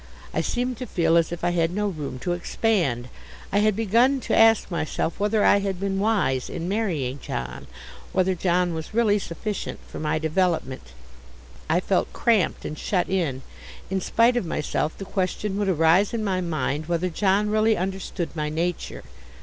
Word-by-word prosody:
I -, -, +1 dB
seemed 250 Hz, 0 st, -2 dB
to 255 Hz, -, -6 dB
feel 165 Hz, -1 st, +2 dB
as 170 Hz, -1 st, +3 dB
if 175 Hz, -1 st, -6 dB
I 175 Hz, -, +2 dB
had 165 Hz, -1 st, +1 dB
no 205 Hz, +4 st, -1 dB
room 150 Hz, -8 st, -4 dB
to 175 Hz, -, -1 dB
expand. 175 Hz, -, 0 dB, 0.4 s
I 200 Hz, -, +3 dB
had 215 Hz, -1 st, +3 dB
begun 230 Hz, +6 st, +3 dB
to -, -, 0 dB
ask 225 Hz, -3 st, +5 dB
myself 160 Hz, +1 st, -2 dB
whether 210 Hz, +1 st, +2 dB
I 205 Hz, -, +6 dB
had 195 Hz, -2 st, -2 dB
been 195 Hz, 0 st, -1 dB
wise 195 Hz, -, +1 dB
in 165 Hz, -, -4 dB
marrying 165 Hz, -, -1 dB
John, 60 Hz, -, -5 dB, 0.4 s
whether 190 Hz, 0 st, +2 dB
John 180 Hz, -1 st, +1 dB
was 160 Hz, +6 st, -6 dB
really 215 Hz, -3 st, +3 dB
sufficient 200 Hz, +3 st, -5 dB
for -, -, -8 dB
my 155 Hz, 0 st, 0 dB
development. 160 Hz, -, -1 dB, 0.8 s
I 170 Hz, -, +3 dB
felt 190 Hz, 0 st, 0 dB
cramped 220 Hz, -8 st, +1 dB
and 155 Hz, -, -5 dB
shut 185 Hz, -3 st, 0 dB
in. 150 Hz, -9 st, -1 dB, 0.5 s
In 190 Hz, 0 st, 0 dB
spite 230 Hz, +6 st, +3 dB
of 240 Hz, -, +1 dB
myself 155 Hz, -2 st, -2 dB
the 195 Hz, -, -6 dB
question 190 Hz, +1 st, -2 dB
would 205 Hz, -2 st, +1 dB
arise 175 Hz, +5 st, +3 dB
in 220 Hz, -, -2 dB
my 190 Hz, -3 st, 0 dB
mind 155 Hz, -2 st, -2 dB
whether 175 Hz, +1 st, 0 dB
John 200 Hz, +4 st, +1 dB
really 215 Hz, 0 st, +3 dB
understood 185 Hz, -2 st, -3 dB
my 150 Hz, -1 st, -1 dB
nature. 170 Hz, +3 st, -3 dB
185 Hz, 175 wpm, -24 LUFS, 160-210 Hz, 0.8 s, I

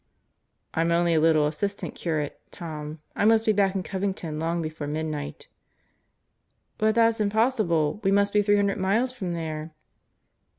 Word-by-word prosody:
"I'm 165 Hz, +1 st, +1 dB
only 170 Hz, 0 st, +3 dB
a 160 Hz, -, +4 dB
little 155 Hz, -1 st, +4 dB
assistant 200 Hz, +7 st, -2 dB
curate, 155 Hz, -4 st, -3 dB
Tom. 155 Hz, -2 st, -7 dB, 0.2 s
I -, -, 0 dB
must 225 Hz, +1 st, +4 dB
be 220 Hz, -, +4 dB
back 200 Hz, -2 st, +2 dB
in 190 Hz, -, -1 dB
Covington 190 Hz, -6 st, -3 dB
long 165 Hz, +2 st, -1 dB
before 155 Hz, -2 st, -4 dB
midnight." 150 Hz, -1 st, -4 dB, 1.3 s
"But 215 Hz, 0 st, +2 dB
that's 230 Hz, -1 st, +3 dB
impossible. 210 Hz, -, +1 dB
We 195 Hz, -, +3 dB
must 200 Hz, 0 st, +3 dB
be 210 Hz, -, +4 dB
three 205 Hz, 0 st, +3 dB
hundred 200 Hz, -1 st, +1 dB
miles 220 Hz, +7 st, +1 dB
from 185 Hz, -9 st, -4 dB
there." 155 Hz, -1 st, -5 dB
175 Hz, 155 wpm, -26 LUFS, 155-205 Hz, 1.3 s, a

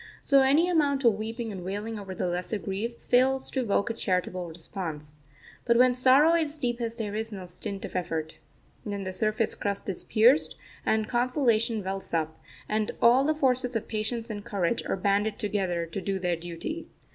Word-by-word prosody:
So 275 Hz, -1 st, +5 dB
any 285 Hz, +6 st, +4 dB
amount 290 Hz, -6 st, +2 dB
of 235 Hz, -3 st, +6 dB
weeping 225 Hz, +2 st, -4 dB
and 190 Hz, -3 st, -7 dB
wailing 205 Hz, +4 st, -4 dB
over 195 Hz, -2 st, -7 dB
the 185 Hz, -, -2 dB
lesser 180 Hz, +4 st, -1 dB
griefs 205 Hz, +5 st, -3 dB
fails 260 Hz, +2 st, +3 dB
to 265 Hz, -, -1 dB
evoke 225 Hz, -2 st, +1 dB
a -, -, -3 dB
charitable 180 Hz, -4 st, -1 dB
response. 160 Hz, -3 st, -6 dB, 0.5 s
But 235 Hz, -1 st, +3 dB
when 250 Hz, +1 st, +6 dB
sorrow 265 Hz, +6 st, +5 dB
is 315 Hz, -2 st, 0 dB
deepest 240 Hz, -4 st, -2 dB
there 210 Hz, -3 st, -3 dB
is 220 Hz, +1 st, -3 dB
no 190 Hz, -3 st, -7 dB
stint 195 Hz, +3 st, -6 dB
of -, -, -9 dB
effort. 160 Hz, -3 st, -3 dB, 0.5 s
Then 200 Hz, -2 st, -4 dB
the 185 Hz, 0 st, -4 dB
surface 215 Hz, +3 st, 0 dB
crust 200 Hz, -1 st, -3 dB
is 190 Hz, -, -2 dB
pierced, 240 Hz, +7 st, +4 dB, 0.3 s
and 220 Hz, -1 st, +2 dB
consolation 240 Hz, -3 st, +1 dB
wells 190 Hz, -2 st, -4 dB
up, 160 Hz, -1 st, -2 dB, 0.3 s
and 215 Hz, 0 st, 0 dB
all 245 Hz, +3 st, +6 dB
the 310 Hz, +2 st, +1 dB
forces 255 Hz, -4 st, +1 dB
of 225 Hz, -, -2 dB
patience 225 Hz, +1 st, -2 dB
and 205 Hz, -1 st, -5 dB
courage 200 Hz, +2 st, -1 dB
are -, -, -1 dB
banded 205 Hz, +2 st, +1 dB
together 190 Hz, -6 st, -1 dB
to 165 Hz, +4 st, -5 dB
do 195 Hz, 0 st, -1 dB
their 180 Hz, -2 st, 0 dB
duty. 175 Hz, -, -6 dB
215 Hz, 185 wpm, -27 LUFS, 190-245 Hz, 0.5 s, of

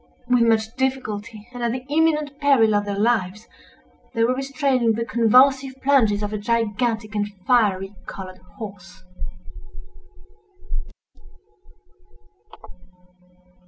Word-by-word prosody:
With 245 Hz, -1 st, +3 dB
much 225 Hz, -1 st, +2 dB
difficulty, 220 Hz, -5 st, -3 dB
and 245 Hz, -, -7 dB
at 235 Hz, -1 st, 0 dB
the 255 Hz, 0 st, -5 dB
imminent 300 Hz, -1 st, +1 dB
peril 265 Hz, -7 st, +4 dB
of 205 Hz, 0 st, +1 dB
their 200 Hz, -1 st, -3 dB
lives, 210 Hz, -1 st, 0 dB, 0.7 s
they 230 Hz, -, +2 dB
were 245 Hz, +2 st, +3 dB
restraining 270 Hz, -3 st, +1 dB
the 230 Hz, +1 st, -2 dB
convulsive 260 Hz, +4 st, +4 dB
plunges 225 Hz, -7 st, +3 dB
of 210 Hz, +1 st, -3 dB
a 210 Hz, -, -2 dB
gigantic 225 Hz, 0 st, -1 dB
and 205 Hz, -1 st, -1 dB, 0.2 s
fiery 200 Hz, -5 st, +2 dB
colored 185 Hz, -1 st, -8 dB, 0.2 s
horse. 190 Hz, -4 st, -10 dB
230 Hz, 105 wpm, -22 LUFS, 210-260 Hz, 0.7 s, peril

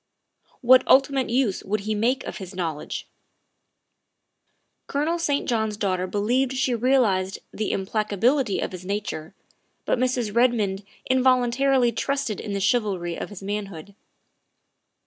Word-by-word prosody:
What 255 Hz, +1 st, +7 dB
ultimate 270 Hz, -1 st, +4 dB
use 240 Hz, -5 st, 0 dB
would 210 Hz, +1 st, -2 dB
he 215 Hz, +2 st, -2 dB
make 235 Hz, +5 st, 0 dB
of -, -, -6 dB
his 190 Hz, -2 st, -9 dB
knowledge? 165 Hz, -5 st, -4 dB, 1.8 s
Colonel 310 Hz, +5 st, -1 dB
St. 290 Hz, -4 st, 0 dB
John's 220 Hz, -3 st, 0 dB
daughter 185 Hz, -3 st, -1 dB
believed 245 Hz, +7 st, 0 dB
she 260 Hz, -1 st, 0 dB
realized 225 Hz, -6 st, +2 dB, 0.2 s
the 215 Hz, -, -2 dB
implacability 215 Hz, +4 st, 0 dB
of -, -, -3 dB
his 185 Hz, -1 st, -8 dB
nature, 195 Hz, -4 st, -4 dB, 0.5 s
but -, -, +1 dB
Mrs. 245 Hz, -4 st, -1 dB
Redmond 220 Hz, -5 st, +2 dB, 0.3 s
involun 255 Hz, -2 st, +3 dB
tarily 255 Hz, -2 st, +2 dB
trusted 275 Hz, -5 st, -2 dB
in 210 Hz, -, -5 dB
the 200 Hz, -, -1 dB
chivalry 195 Hz, -6 st, 0 dB
of -, -, -6 dB
his 200 Hz, -2 st, -10 dB
manhood. 200 Hz, -3 st, -5 dB
220 Hz, 130 wpm, -24 LUFS, 195-255 Hz, 1.8 s, What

